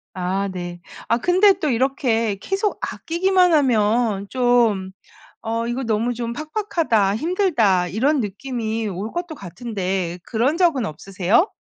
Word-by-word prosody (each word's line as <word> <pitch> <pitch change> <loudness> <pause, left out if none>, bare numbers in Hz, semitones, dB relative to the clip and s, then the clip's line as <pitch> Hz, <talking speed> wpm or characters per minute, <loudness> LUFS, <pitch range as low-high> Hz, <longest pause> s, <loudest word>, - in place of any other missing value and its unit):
아 190 +2 -1
네. 175 -1 -6 0.3
아 230 - +2
근데 370 - +4
또 305 - 0
이렇게 235 -4 +1
계속 390 - -2
아끼기만 360 +1 +1
하면 225 -6 +2
좀 240 -7 +2 0.5
'어 230 +1 -2
이거 240 +3 -2
너무 230 +1 0
좀 235 0 -4
팍팍하다. 305 - 0
힘들다.' 235 - +2
이런 260 - +1
느낌이 225 +1 -3
올 200 +3 -5
것도 345 -2 -4
같은데 190 - -4
그런 250 +7 0
적은 315 - +2
없으세요? 195 - +1
230 Hz, 260 characters per minute, -21 LUFS, 200-300 Hz, 0.5 s, 근데